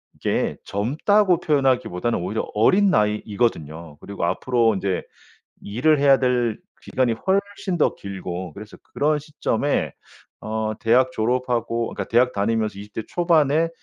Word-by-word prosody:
이게 - - -1
젊다고 170 - +2
표현하기보다는 130 - +1
오히려 95 +5 -2
어린 190 - +4
나이이거든요. 105 - -1
그리고 100 -4 -4
앞으로 115 +3 +1
인제 95 -1 -2 0.6
일을 140 +9 +2
해야 140 -1 +5
될 125 -3 +1 0.2
기간이 125 -3 0
훨씬 195 - -1
더 - - +2
길고 95 -2 -6
그래서 105 +1 -11 0.2
그런 150 +1 +1
시점에 145 -2 -1 0.5
어 110 0 -2
대학 125 +2 +3
졸업하고 120 0 -1
어 - - -8
그러니까 - - -3
대학 125 +2 +3
다니면서 110 0 -1
20 105 +1 -11
대 - - -3
초반에 165 -2 +2
120 Hz, 320 characters per minute, -22 LUFS, 105-145 Hz, 0.6 s, 해야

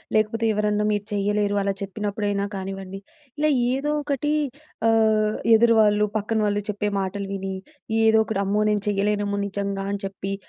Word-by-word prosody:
లేకపోతే 220 +1 +1
ఎవరన్నా 210 0 +1
మీరు 205 -1 -1
చేయలేరు 205 0 0
అలా 195 0 0
చెప్పినప్పుడైనా 205 0 -2
కానివ్వండి. 195 0 -6 0.4
ఇలా 305 +1 +2 0.2
ఏదో 280 +3 -1
ఒకటీ 290 +1 -1 0.6
ఆహ్, 220 -1 +3 0.2
ఎదురువాళ్ళు 220 -2 +4
పక్కన 220 +2 -1
వాళ్ళు 205 0 0
చెప్పే 210 0 -1
మాటలు 195 +1 -3
విని, 195 -1 -4 0.5
ఏదో 220 0 +5
ఒకటి 210 -3 -1
"అమ్మో! 205 +2 +1
నేను 210 -1 0
చేయలేనేమో 205 0 0
నిజంగా" 200 -1 -3
అని 200 - -4
చెప్పి 195 0 -4
205 Hz, 145 wpm, -24 LUFS, 200-215 Hz, 0.6 s, ఏదో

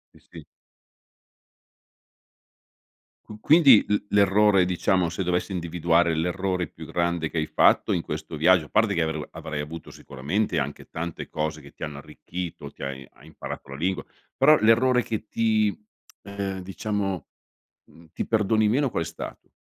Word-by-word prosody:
Sì, - - -18
sì. - - -11 2.8
Q 105 0 -11
quindi 140 -4 +6
l 105 - +2
l'errore, 100 -1 +4
diciamo, 90 0 +1
se 85 +3 -3
dovessi 90 +2 -1
individuare 85 -1 +1
l'errore 90 +2 -1
più - - -11
grande 85 -2 -1
che 85 - -6
hai 80 - 0
fatto - - +3
in 85 - 0
questo 80 0 -6
viaggio 80 +2 +4
a - - -16
parte 110 -2 +2
che 85 - 0
avrei 80 -2 -2
avrai 75 -2 -5
avuto 80 +3 -8
sicuramente 75 +11 -2
anche - - -5
tante 80 0 -6
cose 75 0 -3
che 70 -1 -14
ti - - -10
hanno 75 -2 -5
arricchito 85 +3 -7
ti - - -11
hai 65 -1 -6
hai 75 - -18
imparato 80 -3 -8
la 70 - -7
lingua 90 +4 -1 0.3
però 155 0 +6
l'errore 125 +3 +4
che 110 -1 -4
ti, 110 -2 +1 0.5
ehm 100 -1 -4
diciamo 95 -2 -3 0.6
mhmm, 85 0 -19
ti - - -3
perdoni 110 0 +2
meno 135 +6 +2
qual 85 - -2
è - - -7
stato? - - -9
90 Hz, 160 wpm, -25 LUFS, 80-105 Hz, 2.8 s, quindi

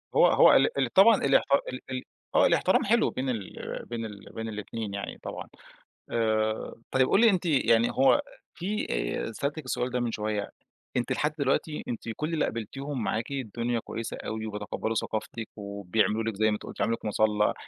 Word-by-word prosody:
هو - - +7
هو - - +7
ال 465 - +3
ال - - 0
طبعًا 210 +3 +8
الاحت 135 - +4 0.3
ال 130 - -6
ال 130 -1 -3 0.3
آه - - +6
الاحترام - - +3
حلو - - +3
بين 130 0 -3
ال 110 -6 -5
بين 115 -1 -3
ال 100 -2 -10
بين 115 0 -4
الاتنين 105 0 -5
يعني 100 - -5
طبعًا، - - -6 0.6
آآ، 110 -1 0 0.2
طيّب 130 -1 +3
قولي 225 +2 +6
أنتِ 180 -2 0
يعني 120 -6 +3
هو 135 +1 +4 0.3
في، 200 +4 -2
آآ، - - -2
سألتِك 145 +4 -3
السؤال 125 0 -1
ده 125 0 -1
من 120 -1 -1
شوية، 105 -1 -2 0.5
أنتِ 120 - 0
لحد 150 +1 0
دلوقتي 145 +2 0
أنتِ 120 0 -5
كل 155 +2 -2
اللي 155 - +1
قابلتيهم 130 +3 -4
معاكِ 110 +4 -2
الدنيا 120 -2 -2
كويسة 115 +1 -5
أوي 110 0 -4
وبيتقبلوا 105 +1 -3
ثقافتِك، 110 0 -3
وبيعملوا 100 +1 0
لِك 110 -2 -3
زي 110 - +1
ما 110 - +3
أنتِ 105 - -6
قُلتِ، - - -9
عملوا 115 - +1
لِك - - -21
مُصلي، 105 0 +2
115 Hz, 185 wpm, -28 LUFS, 110-135 Hz, 0.6 s, طبعًا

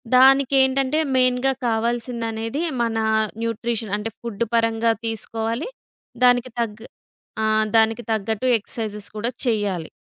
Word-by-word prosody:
దానికేంటంటే, 270 +2 +4 0.2
మెయిన్‌గా 255 +1 +3 0.2
కావాల్సిందనేది 230 +2 -2 0.2
మన 230 -1 0 0.4
న్యూట్రిషన్ 230 -2 -2
అంటే 210 +2 -4
ఫుడ్ 235 -2 -3
పరంగా 230 0 +2
తీసుకోవాలి. 225 - -3 0.5
దానికి 245 0 +4
తగ్ 220 -1 -3 0.6
ఆ! - - +2 0.3
దానికి 225 +1 +3
తగ్గట్టు 220 +3 -1
ఎక్సర్‌సైజ్ 210 -1 -5
కూడా 230 +3 -1 0.2
చెయ్యాలి. 205 -8 -1
230 Hz, 100 wpm, -22 LUFS, 220-250 Hz, 0.6 s, దానికేంటంటే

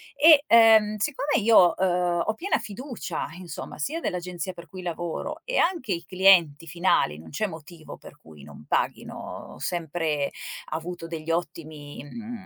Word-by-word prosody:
E, 295 0 +7
ehm, 220 -2 +6
siccome 280 +2 -1
io, 210 -6 +6
uhm, 180 -2 +1
ho 220 - 0
piena 375 - 0
fiducia, 215 - -5
insomma, 175 -4 -8
sia 305 - -2
dell'agenzia 180 - -4
per 170 -2 -13
cui 185 +4 -9
lavoro 175 - -4
e - - -2
anche 335 - +1
i 170 -2 -2
clienti 175 -4 +4
finali 170 - +1
non 80 0 -12
c'è 215 - -1
motivo 160 -1 -11
per - - -14
cui 75 -3 -16
non 75 +1 -13
paghino. - - -3
Ho - - -15
sempre 160 -4 -2 0.4
avuto 165 +2 -5
degli 165 -1 -5
ottimi, 155 -3 -5
mhmm, 220 +7 -9
175 Hz, 155 wpm, -25 LUFS, 160-220 Hz, 0.4 s, E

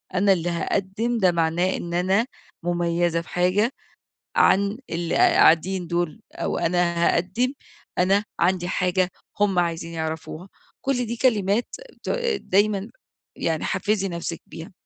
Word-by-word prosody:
أنا 195 +2 +4
اللي 175 -1 -1
هاقدم، 200 +7 -1
ده 185 -4 +4
معناه 170 +2 +1
إن 170 0 -6
أنا 190 +6 +2 0.4
مميزة 170 -1 0
في 170 - -15
حاجة 185 +6 +2 0.7
عن 200 +3 +4
اللي 170 0 -2
قاعدين 175 +3 +4
دول 175 +3 -2
أو - - -2
أنا 175 0 +1 0.2
هاقدم، 225 +10 0 0.4
أنا 195 +3 +3 0.2
عندي 180 0 +2
حاجة 180 0 +1 0.3
هم 200 -3 +2
عايزين 170 -1 -1
يعرفوها، 160 +2 -5 0.4
كل 250 -3 0
دي 235 - -3
كلمات 220 -3 +2 0.4
ت - - -7 0.3
دايمًا 205 +2 +1 0.5
يعني 160 -2 -1
حفزي 205 -2 0
نفسِك 170 -1 -4
بيها. 165 +3 -10
180 Hz, 130 wpm, -24 LUFS, 170-200 Hz, 0.7 s, أنا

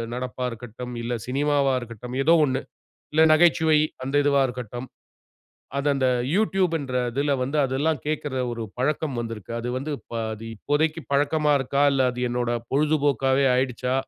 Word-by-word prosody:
நடப்பா 125 0 -4
இருக்கட்டும், 120 +1 -8
இல்ல 120 - -2
சினிமாவா 140 0 +1
இருக்கட்டும். 120 +2 -8
ஏதோ 165 +3 +5
ஒன்னு. 130 -1 -1 0.5
இல்ல 155 - +4
நகைச்சுவை 160 -1 +4 0.3
அந்த 135 +2 -2
இதுவா 140 -1 +4
இருக்கட்டும். 125 0 -6 0.9
அது 140 - -1
அந்த 130 -2 +1 0.2
Youtube 190 -3 +2
ன்ற 130 -2 -3 0.2
இதில 140 +2 0
வந்து 135 +4 -1
அதெல்லாம் 140 +3 0
கேட்கிற 150 -3 -2 0.2
ஒரு 115 -1 -4 0.2
பழக்கம் 145 0 -1
வந்திருக்கு. 115 -3 -7
அது 120 - -4
வந்து 145 +3 -3 0.2
பா 115 - -3 0.2
தி 115 - -7
இப்போதைக்கு 155 +6 0
பழக்கமா 150 +1 +2
இருக்கா? 140 +1 0
இல்ல 135 - +2
அது 125 0 -6
என்னோட 120 0 -1 0.2
பொழுதுபோக்காவே 140 -2 +2
ஆயிடுச்சா? 125 0 0
135 Hz, 150 wpm, -24 LUFS, 125-150 Hz, 0.9 s, ஏதோ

